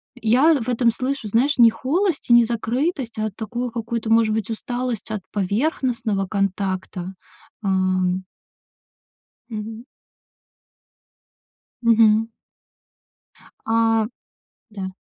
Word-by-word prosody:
Я 255 +7 +4
в 230 - -6
этом 240 -1 +3
слышу, 255 0 -3
знаешь, 265 +7 +2
не 235 -1 +9
холость 325 - -1
и - - +6
не 240 0 +8
закрытость, 240 +2 -2
а 215 0 0
такую 240 +4 -4
какую-то, 230 -1 -3
может 225 -1 +4
быть, 220 -1 -2
усталость 245 0 -4
от 215 -2 -3
поверхностного 215 - -1
контакта. 190 -2 -2 0.5
А, - - -2
м. 185 -1 +1 1.3
Мгм. 220 +1 -6 2.0
Мгм. 225 -1 +4 1.4
А, 225 - -1 0.3
м - - -11 0.6
да. 190 -3 -6
225 Hz, 105 wpm, -22 LUFS, 210-245 Hz, 2.0 s, не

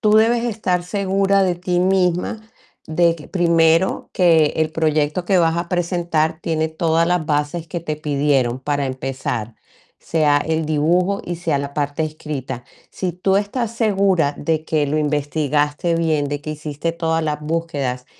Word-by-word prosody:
tú 210 -1 +3
debes 230 +2 +4
estar 195 -6 -1
segura 195 0 +1
de 180 -2 +1
ti 180 0 -1
misma, 185 +2 +1 0.5
de 170 +1 +2
q 150 - -13
primero, 170 0 +2
que 165 -4 +4
el 155 -1 +1
proyecto 155 +1 0
que 190 0 +3
vas 165 -1 +2
a 170 0 -2
presentar, 170 -3 0
tiene 160 -1 -1
todas 165 +1 +1
las 175 -3 0
bases 150 +2 -1
que 170 +1 -4
te 155 -2 -4
pidieron, 140 -4 0
para 145 0 -1
empezar. 130 -4 -4 0.4
Sea 150 -3 +2
el 160 +2 -1
dibujo, 175 +6 +1
y 175 - -4
sea 165 -4 -1
la 140 0 -5
parte 145 +2 -1
escrita. 140 -5 -6 0.3
Si 180 -2 -3
tú 190 +2 +1
estás 210 +3 -1
segura, 195 -9 +2
de 155 +1 -1
que 155 -2 0
lo 150 +2 -1
investigaste 150 +1 0
bien, 155 -3 +1
de 145 0 -3
que 155 - -6
hiciste 155 +1 -4
todas 165 -1 -1
las 150 -1 -2
búsquedas, 150 -6 -3
160 Hz, 160 wpm, -20 LUFS, 150-180 Hz, 0.5 s, debes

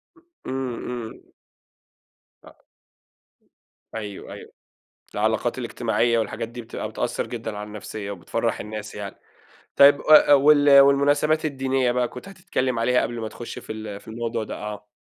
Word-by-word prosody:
م - - -28 0.3
إمم، 130 -2 -3
إمم. 120 -2 -6 1.2
أ - - -16 1.4
أيوه، 105 -3 -7
أيوه، - - -11 0.6
العلاقات - - 0
الاجتماعية 115 0 0
والحاجات 115 +1 -3
دي 120 0 -8
بتبقى 115 - -6
بتأثر - - -3
جدًا 110 -3 -5
على 105 0 -6
النفسية 105 0 -7
وبتفرّح 90 -4 -2
الناس 105 0 -7
يعني. 100 -1 -6 0.6
طيب 140 +1 +7
أ 155 -1 +7
وال 145 0 +7
والمناسبات 145 +3 +3
الدينية 135 -3 0
بقى، 125 0 +1
كنت 125 +9 -11
هتتكلم 130 - -2
عليها 125 +2 +3
قبل 120 +1 -3
ما 110 - -3
تخُش 120 +2 -8
في - - -9
ال 110 -2 -6
في - - -21
الموضوع 115 0 -3
ده، - - -6
آه. 105 0 -7
120 Hz, 145 wpm, -24 LUFS, 110-140 Hz, 1.4 s, طيب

